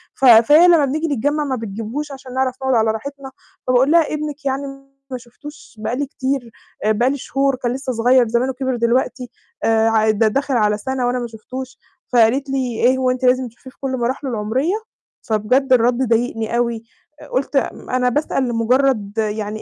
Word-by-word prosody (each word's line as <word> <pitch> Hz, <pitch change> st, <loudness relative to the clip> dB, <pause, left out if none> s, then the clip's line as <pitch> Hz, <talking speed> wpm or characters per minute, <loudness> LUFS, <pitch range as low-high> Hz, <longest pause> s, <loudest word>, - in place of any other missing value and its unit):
ف 270 Hz, -, 0 dB
فهي 260 Hz, +9 st, +7 dB
لمّا 330 Hz, -5 st, +5 dB
بنيجي 310 Hz, +4 st, -2 dB
نتجمّع 290 Hz, +2 st, 0 dB
ما 265 Hz, -, -1 dB
بتجيبهوش 225 Hz, +6 st, -5 dB
عشان 265 Hz, -2 st, -10 dB
نعرف 260 Hz, -1 st, 0 dB
نقعد 265 Hz, -1 st, +2 dB
على 220 Hz, -1 st, +3 dB
راحتنا، 270 Hz, +4 st, -7 dB, 0.4 s
فباقول 255 Hz, +3 st, +3 dB
لها 330 Hz, -2 st, +3 dB
ابنِك 300 Hz, -1 st, -5 dB
يعني 270 Hz, +1 st, -1 dB, 0.5 s
ما 255 Hz, -, -3 dB
شُفتوش 290 Hz, +5 st, -13 dB
بقى 225 Hz, +3 st, -2 dB
لي 285 Hz, -, -1 dB
كتير، 265 Hz, -3 st, -3 dB, 0.3 s
آآ، 215 Hz, -, +3 dB
بقى 235 Hz, +4 st, +2 dB
لي 280 Hz, -, -2 dB
شهور، 275 Hz, +1 st, 0 dB
كان 245 Hz, -1 st, -2 dB
لسه 260 Hz, -1 st, -4 dB
صغير 245 Hz, +1 st, +3 dB
زمانُه 245 Hz, +3 st, 0 dB
كِبِر 260 Hz, 0 st, -2 dB
دلوقتي، 245 Hz, +1 st, 0 dB, 0.3 s
آآ، 225 Hz, 0 st, +3 dB
ع 220 Hz, -1 st, +2 dB
ده 215 Hz, +1 st, +2 dB
داخل 275 Hz, +4 st, -1 dB
على 210 Hz, -2 st, +2 dB
سنة 260 Hz, +2 st, -2 dB
وأنا 250 Hz, +1 st, 0 dB
ما 240 Hz, -, -4 dB
شُفتوش، 255 Hz, +4 st, -9 dB, 0.4 s
فقالت 245 Hz, +4 st, +3 dB
لي: 270 Hz, -, -1 dB, 0.3 s
"إيه 255 Hz, +2 st, +4 dB
هو 255 Hz, -1 st, +1 dB
أنتِ 255 Hz, 0 st, -2 dB
لازم 255 Hz, 0 st, +3 dB
تشوفيه 240 Hz, +3 st, -14 dB
في -, -, -32 dB
كُلّ 260 Hz, -1 st, -2 dB
مراحلُه 260 Hz, +3 st, -2 dB
العمرية؟" 240 Hz, -, -1 dB, 0.5 s
فبجد 250 Hz, +5 st, +1 dB
الرد 240 Hz, 0 st, +3 dB
ضايقني 230 Hz, 0 st, 0 dB
أوي، 235 Hz, -2 st, -1 dB, 0.4 s
آآ، -, -, -12 dB
قلت 275 Hz, +2 st, -1 dB
م -, -, -3 dB
أنا 250 Hz, 0 st, +1 dB
باسأل 280 Hz, 0 st, -1 dB
لمجرد 230 Hz, -2 st, +1 dB
يعني 215 Hz, 0 st, -2 dB
255 Hz, 190 wpm, -19 LUFS, 230-270 Hz, 0.5 s, فهي